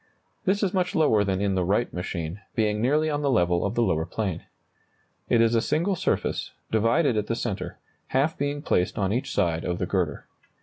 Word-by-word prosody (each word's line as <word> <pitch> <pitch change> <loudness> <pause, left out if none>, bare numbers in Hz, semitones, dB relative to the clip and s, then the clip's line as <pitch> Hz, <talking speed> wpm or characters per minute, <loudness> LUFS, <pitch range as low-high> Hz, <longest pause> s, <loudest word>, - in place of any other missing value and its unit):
This 200 +3 +2
is 190 - +1
much 180 -2 0
lower 130 -10 +4
than 95 -2 0
in 100 -1 +1
the 95 -1 +1
Wright 100 +7 0
machine, 90 +1 -4
being 105 -1 +1
nearly 150 +6 +2
on 145 -1 -1
the 140 - +1
level 90 -7 +2
of 100 +3 -2
the 120 - +3
lower 80 -6 0
plane. 100 -6 -3 0.9
It 120 - +4
is 115 0 +3
a 115 - +3
single 175 - +1
surface, - - -1 0.2
divided 115 +4 +2
at 105 - -1
the 115 - 0
centre, 110 -4 -4 0.3
half 145 +5 +1
being 145 +1 -2
placed 90 - +1
on 100 -1 +1
each 125 - -2
side 85 -4 0
of 90 0 -2
the 90 - -1
girder. 90 -3 -1
110 Hz, 205 wpm, -26 LUFS, 95-145 Hz, 0.9 s, lower